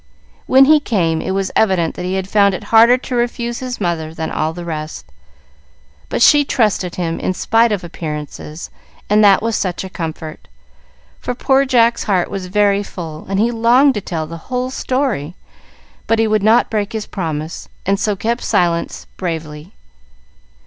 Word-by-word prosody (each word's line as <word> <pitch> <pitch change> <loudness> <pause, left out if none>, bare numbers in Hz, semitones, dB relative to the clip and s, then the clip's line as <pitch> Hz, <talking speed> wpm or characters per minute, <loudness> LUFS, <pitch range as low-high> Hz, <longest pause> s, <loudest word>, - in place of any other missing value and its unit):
When 265 +1 +6
he 305 +2 +6
came, 170 - 0
it - - -4
was 195 0 -1
evident 185 -6 +2
that 180 - -6
he 185 +1 -2
had 190 -1 -2
found 200 -1 +3
it 210 - -7
harder 230 +3 +7
to 255 0 -5
refuse 240 0 -2
his 255 -2 -5
mother 165 -4 -2
than 160 -1 -4
all 155 +1 -1
the 175 +1 -8
rest. 155 - -6 1.0
But - - +1
she 295 -1 +6
trusted 210 -9 0
him 165 -2 -2
in 185 - -2
spite 225 +4 +2
of 205 -4 -2
appearances, 155 -1 -7 0.4
and 210 +1 +5
that 200 0 +5
was 230 -1 0
such 185 -2 -2
a 190 - -8
comfort! 160 -3 -6 0.7
For 250 - -4
poor 270 +2 +2
Jack's 240 -3 +2
heart 185 -4 0
was 190 -2 -5
very 200 +1 +2
full, 165 -6 -8
and 195 0 0
he 230 +3 +2
longed 240 +4 +4
to 210 - -3
tell 165 -4 -4
the 165 +2 -8
whole 255 0 -2
story, 255 - -2 0.7
but 225 - +2
he 225 - +2
would 215 -1 +1
not 220 +4 +3
break 210 -1 -2
his 220 -1 -3
promise, 160 -4 -5 0.2
and 195 +1 +1
so 210 -1 0
kept 230 +5 -2
silence 170 -1 0
bravely. 160 -1 -5
195 Hz, 175 wpm, -17 LUFS, 170-230 Hz, 1.0 s, harder